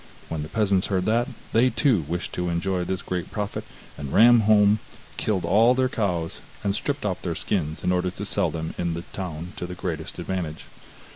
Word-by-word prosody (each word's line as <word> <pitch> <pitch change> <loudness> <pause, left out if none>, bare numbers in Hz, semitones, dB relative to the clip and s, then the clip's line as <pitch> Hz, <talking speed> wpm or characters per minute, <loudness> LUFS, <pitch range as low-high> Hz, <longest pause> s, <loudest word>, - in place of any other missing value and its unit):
When 80 -2 -2
the 75 - -6
peasants 100 -4 +2
heard 95 -2 0
that, 120 +3 +2 0.3
they 120 +3 +5
too 125 - +2
wished 85 +2 -3
to 90 0 -1
enjoy 90 +2 0
this 95 +1 -3
great 90 -2 -3
profit, 105 -1 -3 0.4
and 70 -2 -5
ran 120 +1 +7
home, 105 -1 +5 0.4
killed 100 -4 0
all 115 +6 +5
their 130 0 +2
cows, 90 -9 -1 0.2
and 100 - +1
stripped 140 +4 -2
off 95 -3 -1
their 85 -3 -2
skins 80 -6 -2
in 90 - +2
order 90 0 +1
to 90 - -6
sell - - +1
them 80 0 -4
in 85 -1 0
the 85 - -5
town 90 -2 -5
to 90 - -4
the 90 - -6
greatest 85 -3 -4
advantage. 85 -3 -4
90 Hz, 200 wpm, -25 LUFS, 85-105 Hz, 0.4 s, ran